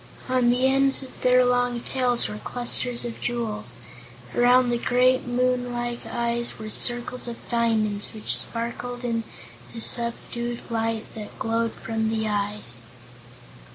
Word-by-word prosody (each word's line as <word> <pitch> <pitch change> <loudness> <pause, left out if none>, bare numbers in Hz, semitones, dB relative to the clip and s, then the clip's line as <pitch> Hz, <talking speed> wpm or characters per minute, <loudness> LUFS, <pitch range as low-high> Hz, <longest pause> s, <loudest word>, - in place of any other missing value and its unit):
On 255 -1 +2
the 250 +2 +2
ends 270 +1 +4
of 260 - -13
their 250 0 +5
long 245 -1 +1
tails 245 0 +1
were 105 0 -6
clusters 245 - +3
of 235 - -6
jewels. 230 -3 -3 0.6
Around 245 0 +4
the 240 - 0
great, 255 +1 +2
moon 250 0 0
like 240 -1 -4
eyes 235 +1 -2
were 215 0 -7
circles 245 +2 0
of 235 -1 -8
diamonds 220 -3 +1
which 215 -1 -1
sparkled 240 +1 -4
in 230 -1 -1 0.5
the - - -5
subdued 235 +1 0
light 225 -1 -1
that 215 -2 -9
glowed 230 0 -1
from 220 -1 -2
the 220 -1 -1
eyes. 200 - +1
235 Hz, 140 wpm, -24 LUFS, 225-245 Hz, 0.6 s, their